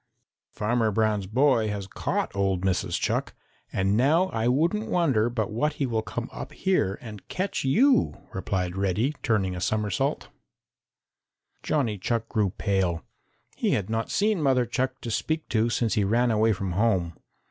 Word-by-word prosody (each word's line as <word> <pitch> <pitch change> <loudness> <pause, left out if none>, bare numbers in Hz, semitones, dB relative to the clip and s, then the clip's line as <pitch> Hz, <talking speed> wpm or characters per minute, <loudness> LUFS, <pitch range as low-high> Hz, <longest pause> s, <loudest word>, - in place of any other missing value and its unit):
"Farmer 110 +1 0
Brown's 105 -2 +1
boy 125 0 +3
has 100 -2 -3
caught 95 - -2
old 95 -2 +1
Mrs. 95 -2 0
Chuck, - - -1 0.4
and 95 +1 +1
now 155 - +3
I 115 +1 -1
wouldn't 170 - +1
wonder 135 -11 +2
but 110 -4 -2
what 145 +8 0
he 145 - -1
will 115 -3 0
come - - -5
up - - -7
here 140 - +1
and 105 -4 -10
catch 185 +2 -2
you," 245 - +3 0.2
replied 95 -2 -2
Reddy, 100 +8 0
turning 95 -6 0
a 90 - -5
somersault. 105 0 -1 1.3
Johnny 120 -9 0
Chuck 115 +3 -1
grew 105 -4 +1
pale. 95 -4 -1 0.5
He - - 0
had 105 0 -1
not 115 0 -1
seen 210 -3 +1
Mother 130 -4 +3
Chuck 130 +2 -2
to 115 - -4
speak 155 +7 -1
to 115 0 +2
since 115 -1 0
he 105 - +2
ran 120 +4 +2
away 110 +1 +3
from 95 -2 -2
home. 90 -3 +1
110 Hz, 160 wpm, -26 LUFS, 100-130 Hz, 1.3 s, boy